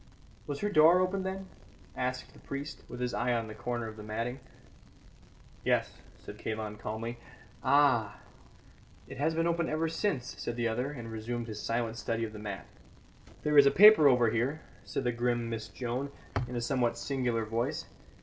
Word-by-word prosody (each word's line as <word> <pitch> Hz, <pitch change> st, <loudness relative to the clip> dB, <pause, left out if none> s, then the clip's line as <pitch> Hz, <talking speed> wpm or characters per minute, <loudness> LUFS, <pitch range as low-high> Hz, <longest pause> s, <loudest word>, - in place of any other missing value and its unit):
"Was 145 Hz, -1 st, -4 dB
her 205 Hz, -, +1 dB
door 165 Hz, +1 st, +7 dB
open 185 Hz, +1 st, +1 dB
then?" 190 Hz, 0 st, -4 dB, 0.5 s
asked 125 Hz, 0 st, -3 dB
the -, -, -16 dB
priest, 140 Hz, +2 st, -6 dB
with 125 Hz, -, -7 dB
his 125 Hz, -1 st, -1 dB
eye 120 Hz, 0 st, +1 dB
on 115 Hz, -1 st, 0 dB
the 110 Hz, -, -8 dB
corner 120 Hz, +1 st, -3 dB
of 110 Hz, 0 st, -9 dB
the 105 Hz, -, -8 dB
matting. 115 Hz, +4 st, -3 dB, 1.2 s
"Yes," -, -, +1 dB, 0.2 s
said -, -, -11 dB
Kalon 110 Hz, -1 st, -4 dB
calmly. 115 Hz, +3 st, -5 dB, 0.4 s
"Ah! 130 Hz, -6 st, +4 dB, 0.9 s
it -, -, -9 dB
has 160 Hz, +3 st, +1 dB
been 165 Hz, 0 st, +1 dB
open 170 Hz, -1 st, +1 dB
ever 155 Hz, +2 st, 0 dB
since," 165 Hz, -, -1 dB
said 120 Hz, -, -3 dB
the 120 Hz, -1 st, 0 dB
other, 125 Hz, +5 st, -1 dB
and 120 Hz, -5 st, -7 dB
resumed 115 Hz, +2 st, -4 dB
his 110 Hz, -2 st, -6 dB
silent 115 Hz, -1 st, -1 dB
study 115 Hz, 0 st, -2 dB
of 110 Hz, -, -8 dB
the 105 Hz, -, -8 dB
mat. 100 Hz, -3 st, -5 dB, 0.8 s
"There 150 Hz, -1 st, +6 dB
is 140 Hz, -, +8 dB
a -, -, +8 dB
paper 210 Hz, -3 st, +8 dB
over 125 Hz, -4 st, +5 dB
here," 130 Hz, +7 st, 0 dB, 0.2 s
said -, -, -3 dB
the 125 Hz, -, +1 dB
grim 120 Hz, -1 st, -1 dB
Miss 110 Hz, -1 st, -4 dB
Joan, 125 Hz, +4 st, -3 dB, 0.4 s
in 125 Hz, -, -6 dB
a 120 Hz, -, -1 dB
somewhat 120 Hz, -2 st, +1 dB
singular 120 Hz, -4 st, -1 dB
voice. 125 Hz, +9 st, -2 dB
120 Hz, 180 wpm, -31 LUFS, 115-145 Hz, 1.2 s, is